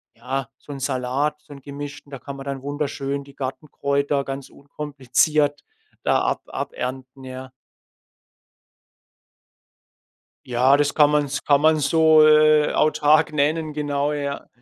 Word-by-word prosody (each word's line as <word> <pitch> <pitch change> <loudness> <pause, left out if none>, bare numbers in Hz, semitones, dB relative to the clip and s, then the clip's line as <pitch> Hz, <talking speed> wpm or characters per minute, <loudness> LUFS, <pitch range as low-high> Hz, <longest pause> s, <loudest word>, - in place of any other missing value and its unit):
ja, 130 +3 -4
so 145 - -13
'n 140 - -6
Salat, 135 +3 -1
so 145 - -14
'n 140 - -13
gemischten. 140 +1 -9
Da 135 - -7
kann 140 +2 -8
man 135 - -9
dann 140 -1 -5
wunderschön 140 -1 -3
die 140 0 -17
Gartenkräuter 140 +1 -2
ganz 135 0 -7
unkompliziert 145 +1 -1 0.4
da - - +2
ab - - -1
abernten, 130 +1 -6
ja. 130 0 -9 2.9
Ja, 130 +3 +3
das 145 0 +1
kann 150 -1 +5
man 150 -1 +2
's 140 +2 -4
kann 145 -1 +3
man 155 0 +4
so, 155 +1 +5
äh, 155 0 +5
autark 155 +1 +3
nennen 150 +1 0
genau, 145 0 -1
ja. 140 -1 -4
140 Hz, 135 wpm, -22 LUFS, 135-150 Hz, 2.9 s, kann